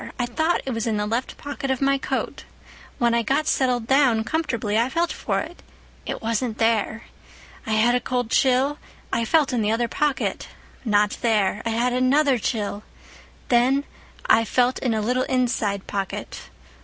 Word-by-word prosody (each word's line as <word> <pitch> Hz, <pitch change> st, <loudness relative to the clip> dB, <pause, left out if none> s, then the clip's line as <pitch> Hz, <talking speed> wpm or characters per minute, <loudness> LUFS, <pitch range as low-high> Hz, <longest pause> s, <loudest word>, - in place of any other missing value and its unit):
I 245 Hz, -, 0 dB
thought 315 Hz, +8 st, 0 dB
it 265 Hz, -, -2 dB
was 230 Hz, -1 st, -2 dB
in 220 Hz, -2 st, 0 dB
the 210 Hz, -, -1 dB
left 230 Hz, +4 st, -3 dB
pocket 285 Hz, -1 st, -5 dB
of 265 Hz, -1 st, 0 dB
my 275 Hz, 0 st, +2 dB
coat. -, -, -3 dB, 0.5 s
When 235 Hz, -1 st, +2 dB
I 235 Hz, -, +3 dB
got 275 Hz, +7 st, 0 dB
settled 250 Hz, -5 st, +1 dB
down 255 Hz, -4 st, +3 dB
comfortably 235 Hz, -8 st, -2 dB
I 230 Hz, +3 st, +2 dB
felt 340 Hz, +4 st, 0 dB
for -, -, -2 dB
it. 330 Hz, +3 st, -9 dB, 0.5 s
It -, -, -4 dB
wasn't 230 Hz, 0 st, -1 dB
there. 225 Hz, 0 st, +1 dB, 0.6 s
I 220 Hz, -, 0 dB
had 220 Hz, +3 st, +3 dB
a 250 Hz, -, +3 dB
cold 245 Hz, -2 st, -2 dB
chill. 270 Hz, +3 st, +2 dB, 0.3 s
I 230 Hz, -, +1 dB
felt 290 Hz, +1 st, +2 dB
in 240 Hz, -, +1 dB
the 210 Hz, 0 st, +1 dB
other 235 Hz, +1 st, +1 dB
pocket. 295 Hz, +2 st, -1 dB, 0.4 s
Not 210 Hz, -3 st, +2 dB
there. 210 Hz, -3 st, +1 dB
I -, -, 0 dB
had 240 Hz, +2 st, +1 dB
another 260 Hz, +1 st, +3 dB
chill. 210 Hz, -2 st, -2 dB, 0.7 s
Then 255 Hz, +3 st, +3 dB, 0.4 s
I 225 Hz, -, +5 dB
felt 250 Hz, +3 st, +1 dB
in 240 Hz, -4 st, 0 dB
a 215 Hz, -, 0 dB
little 250 Hz, +4 st, +1 dB
inside 235 Hz, -6 st, 0 dB
pocket. 195 Hz, -1 st, -5 dB
240 Hz, 175 wpm, -23 LUFS, 225-265 Hz, 0.7 s, I